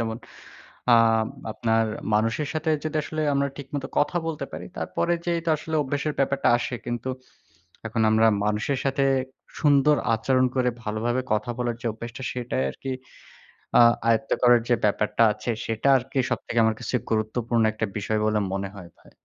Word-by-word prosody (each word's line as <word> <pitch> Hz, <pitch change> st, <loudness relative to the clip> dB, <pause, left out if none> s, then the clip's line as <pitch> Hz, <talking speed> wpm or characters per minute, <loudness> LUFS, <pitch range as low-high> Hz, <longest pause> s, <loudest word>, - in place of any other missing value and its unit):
যেমন 110 Hz, -1 st, -2 dB, 1.4 s
আপনার 115 Hz, 0 st, +1 dB, 0.3 s
মানুষের 115 Hz, +7 st, +1 dB
সাথে 160 Hz, 0 st, -1 dB
যদি 155 Hz, 0 st, -4 dB
আসলে 155 Hz, +1 st, -4 dB
আমরা 140 Hz, 0 st, +1 dB
ঠিক 140 Hz, -2 st, -8 dB
মতো 135 Hz, -2 st, -3 dB
কথা 150 Hz, +4 st, +2 dB
বলতে 150 Hz, -4 st, -3 dB
পারি। -, -, -7 dB
তারপরে 175 Hz, -, -1 dB
যে 175 Hz, -, 0 dB, 0.2 s
আসলে 155 Hz, +1 st, -5 dB
অভ্যাসের 145 Hz, +2 st, -2 dB
ব্যাপারটা 140 Hz, 0 st, +2 dB
আসে। 120 Hz, +1 st, -3 dB
কিন্তু 120 Hz, +1 st, -3 dB, 0.8 s
এখন 110 Hz, +1 st, -1 dB
আমরা 110 Hz, +1 st, +5 dB, 0.2 s
মানুষের 105 Hz, +6 st, 0 dB
সাথে 135 Hz, 0 st, +1 dB, 0.6 s
সুন্দর 145 Hz, 0 st, +4 dB, 0.2 s
আচরণ 130 Hz, +3 st, +2 dB
করে 125 Hz, -1 st, +2 dB
ভালোভাবে 115 Hz, +4 st, -1 dB
কথা 110 Hz, +3 st, -1 dB
বলার 120 Hz, -1 st, -1 dB
যে -, -, -9 dB
অভ্যাসটা। 115 Hz, +3 st, -8 dB
সেটাই 120 Hz, -, -2 dB
আরকি 135 Hz, -, -6 dB, 0.9 s
আ -, -, +9 dB, 0.3 s
আয়ত্ত 115 Hz, +4 st, +1 dB
করার 120 Hz, -1 st, +6 dB
যে 120 Hz, -, +5 dB
ব্যাপারটা 105 Hz, +2 st, +2 dB
আছে 120 Hz, -, -3 dB
সেটা 115 Hz, +3 st, -2 dB
আরকি 130 Hz, +2 st, -6 dB
সবথেকে 120 Hz, -, -1 dB
আমার 110 Hz, 0 st, +2 dB
কাছে 125 Hz, +1 st, -3 dB
গুরুত্বপূর্ণ 115 Hz, +1 st, 0 dB
একটা 110 Hz, +1 st, -2 dB
বিষয় 105 Hz, +1 st, -1 dB
বলে 110 Hz, 0 st, +2 dB
মনে 100 Hz, 0 st, -3 dB
হয় 90 Hz, -3 st, -10 dB
ভাই। -, -, -20 dB
120 Hz, 160 wpm, -25 LUFS, 110-140 Hz, 1.4 s, আ